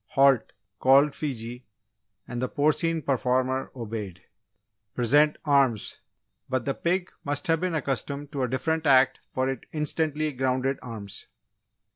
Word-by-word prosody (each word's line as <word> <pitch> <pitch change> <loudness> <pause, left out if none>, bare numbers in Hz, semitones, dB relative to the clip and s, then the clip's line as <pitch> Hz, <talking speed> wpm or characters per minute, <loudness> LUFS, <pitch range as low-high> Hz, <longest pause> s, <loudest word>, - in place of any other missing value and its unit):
"Halt!" 135 -3 +4 0.3
called 140 +2 +5
Fiji, 125 -4 -5 0.6
and 125 0 -4
the 130 - -1
porcine 155 +2 +1
performer 130 0 0
obeyed. 105 -7 -6 0.7
"Present 145 +5 +4
arms!" 135 -7 +2 0.5
but 130 -2 -1
the 140 - 0
pig 180 +4 -1
must 145 0 -1
have 165 0 +1
been 180 -2 -1
accustomed 140 0 -3
to 140 -3 -3
a 130 - +1
different 155 +5 -1
act 130 -1 +5
for 130 0 0
it 135 -3 -4
instantly 155 0 -1
grounded 130 +1 0
arms. 110 -5 -6
135 Hz, 130 wpm, -26 LUFS, 125-150 Hz, 0.7 s, called